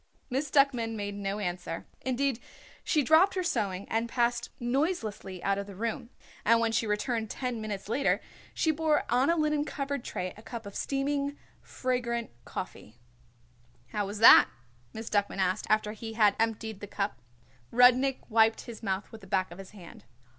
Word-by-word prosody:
Miss 275 +3 -1
Duckman 255 -5 +2
made 205 -1 -4
no 200 0 -3
answer. 180 -4 -4 0.2
Indeed 260 -1 0 0.4
she 300 -3 +2
dropped 325 +8 +5
her 370 - 0
sewing 200 - -1
and 225 +1 -1
passed 235 0 0
noiselessly 240 - -2
out 195 0 +1
of 200 - -5
the 200 - -9
room, 230 +4 -3 0.3
and 230 +1 +5
when 230 0 +1
she 225 0 0
returned 220 +1 -1
ten 250 -3 -3
minutes 205 -3 -5
later 275 +6 +1 0.3
she 320 - +1
bore 310 -1 +1
on 255 +4 +3
a 335 - +4
linen 300 -1 +1
covered 280 -3 -3
tray 180 0 -4
a 215 - -13
cup 230 0 -7
of 200 - -8
steaming, 280 +2 -1 0.2
fragrant 235 -2 -2
coffee. 110 - -7 0.9
"How 205 -2 -2
was 205 +2 -5
that?" 225 - +9 0.4
Miss 220 +6 -7
Duckman 205 -2 0
asked 190 +1 0
after 215 -1 +2
he 225 +1 -7
had 210 -2 +4
emptied 220 -2 -1
the 205 - -7
cup. 200 -8 -3 0.5
Rudnik 255 +2 +5
wiped 225 -1 +4
his 235 -2 -9
mouth 195 -2 -2
with 225 - -11
the 195 - -13
back 185 0 0
of 175 - -10
his 195 - -9
hand. 185 - -13
225 Hz, 175 wpm, -29 LUFS, 205-265 Hz, 0.9 s, that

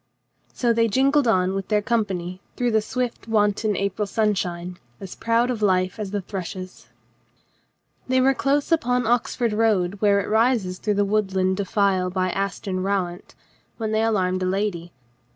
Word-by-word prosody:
So 240 -2 +1
they 230 0 +3
jingled 270 +4 +2
on 185 -4 +2
with 195 -1 -3
their 210 -1 +1
company 190 -6 -2
through 245 -1 0
the 220 -1 +3
swift 245 +1 -4
wanton 210 -1 +1
April 200 +1 -1
sunshine, 180 -4 -1 0.2
as 190 -2 -8
proud 230 +2 +1
of 230 -3 -4
life 185 0 +1
.as 210 -2 -3
the 205 0 -2
thrushes. 185 0 -7 1.2
They 260 0 +2
were 265 +1 +4
close 280 +3 0
upon 250 -6 +2
the 225 - -2
Oxford 240 -1 0
road 205 -4 +1
where 200 -1 +4
it 200 - -3
rises 220 -5 +1
through 210 -1 0
the 205 0 +2
woodland 190 -2 0
defile 195 -2 +1
by 185 0 -1
Aston 195 -1 -3
Rowant 185 -2 -3 0.4
when 220 -2 -3
they 220 0 +1
alarmed 185 -5 +1
a 185 - 0
lady. 185 -3 -2
205 Hz, 165 wpm, -23 LUFS, 185-225 Hz, 1.2 s, were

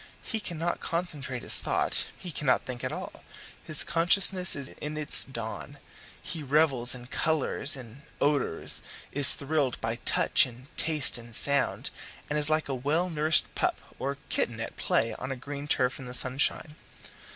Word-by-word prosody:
He 225 - -3
cannot 170 -4 -3
concentrate 150 -8 -3
his - - +2
thought - - +1
he 180 - -7
cannot 145 -3 0
think 125 -2 -7
at - - -2
all; - - -8 0.4
his 155 -2 +6
consciousness 180 +2 +2
is 140 -2 -4
in 150 +1 -5
its 150 -1 +5
dawn; 115 -4 -8 0.4
he 160 - -5
revels 140 -4 +2
in 120 -1 -11
colours, 145 +1 -1
in 125 0 -12 0.2
odours, 145 - 0 0.3
is 140 -2 +5
thrilled 140 -3 -1
by 115 +1 -3
touch 120 - +3
and 125 +3 -15
taste 155 -6 +2
and 115 -1 -1
sound, 140 +2 +4 0.4
and 150 - 0
is 150 0 +9
like 155 0 +1
a 140 - -3
well 155 +8 -1
nourished 155 0 +2
pup - - -1 0.2
or 140 +1 -3
kitten 115 -1 -1
at 115 - -6
play 115 0 0
on 130 +1 -6
a - - -3
green 140 +3 -8
turf 130 -3 +1
in 130 - -9
the 125 - -4
sunshine. 135 +4 -1
140 Hz, 165 wpm, -27 LUFS, 125-155 Hz, 0.4 s, is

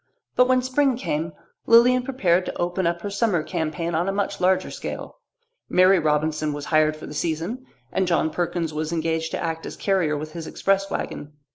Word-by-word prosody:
But 250 - +5
when 255 -1 +3
spring 260 0 +2
came 165 - -2 0.3
Lilian 245 +2 +6
prepared 190 -9 +1
to - - -4
open 175 +1 0
up 170 0 -2
her 205 - -3
summer 200 -6 +1
campaign 165 0 -3
on 170 +4 +1
a - - +1
much 200 0 -2
larger 185 +1 +2
scale. - - -7 0.5
Mary 185 +1 +5
Robinson 155 0 0
was 145 0 -5
hired 155 0 +4
for 155 - -10
the - - -8
season, 170 - -3 0.2
and 190 - 0
John 165 -2 +1
Perkins 170 -1 -2
was 155 +1 -3
engaged 160 -1 -1
to - - -3
act 165 -1 -3
as - - -8
carrier 180 -7 +1
with 155 +1 -6
his 165 -2 -6
express 195 0 0
wagon. 145 +1 -5
170 Hz, 190 wpm, -24 LUFS, 155-195 Hz, 0.5 s, Lilian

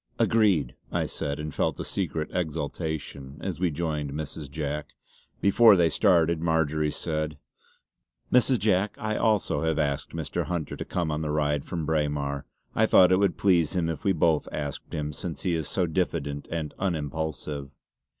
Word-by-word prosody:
"Agreed!" 100 - +3 0.2
I - - 0
said 70 0 -3
and 75 -1 -5
felt - - 0
a - - -2
secret 80 -1 -2
exultation 80 -4 -3
as 95 -3 -4
we 90 -1 +2
joined 75 -3 -2
Mrs. 75 -1 -5
Jack. 75 +1 -4 0.5
Before 105 +2 +7
they 85 -3 +4
started 85 -3 +3
Marjory 80 -2 +1
said: 75 -1 -3 1.0
"Mrs. 125 +1 +5
Jack 100 -1 +1
I 110 0 -2
also 110 -3 +2
have 80 -1 +1
asked 70 0 -1
Mr. 80 -5 -2
Hunter 85 -4 -3
to - - -5
come 85 -3 -1
on 75 +1 -2
the 75 - -2
ride 75 -1 0
from 85 -3 -3
Braemar. 75 -3 -1 0.3
I - - +3
thought 90 -1 +6
it 95 - +5
would 100 -3 +2
please 90 -4 +3
him 85 -2 +1
if 80 - -4
we 100 - +3
both 80 -3 +2
asked 70 -2 -5
him, 75 0 -3
since 85 0 -6
he 90 -3 +1
is 80 -3 -1
so 90 - +1
diffident 80 -4 -2
and 80 -3 -3
unimpulsive!" 75 -5 -3
80 Hz, 170 wpm, -27 LUFS, 75-90 Hz, 1.0 s, Before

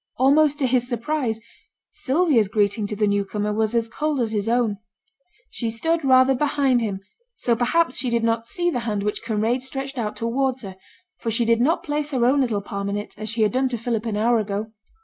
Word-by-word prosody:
Almost 285 +3 +4
to 280 - 0
his 250 -1 +1
surprise, 240 -1 -1 0.5
Sylvia's 275 - +2
greeting 205 +1 0
to 210 - -4
the 210 +1 +1
new 200 0 +1
comer 210 +1 -2
was 220 +1 0
as 230 -1 +2
cold 295 +4 -2
as 230 -3 0
his 210 0 -1
own. 230 -4 +1 0.7
She 230 - -3
stood 325 +9 0
rather 260 0 +5
behind 275 -2 +1
him; 200 -4 -3 0.3
so 240 - +1
perhaps 255 +4 +1
she 250 0 0
did 235 -1 0
not 230 0 0
see 350 +4 0
the 250 - -1
hand 205 -1 -1
which 210 0 -2
Kinraid 225 +3 0
stretched 270 0 -4
out 215 -2 -2
towards 255 +2 -1
her, 190 -2 -7 0.4
for 230 - -3
she 230 +1 0
did 230 0 +3
not 315 +7 +2
place 295 0 -2
her 255 -5 +1
own 275 +3 +4
little 225 -6 0
palm 200 0 -4
in 200 - -1
it, 205 - -6
as 215 0 -4
she 225 -1 0
had 210 - +2
done 260 +1 +1
to 240 - -2
Philip 230 0 -2
an 210 -2 -2
hour 230 +2 +3
ago. 210 +1 -3
235 Hz, 220 wpm, -23 LUFS, 215-265 Hz, 0.7 s, rather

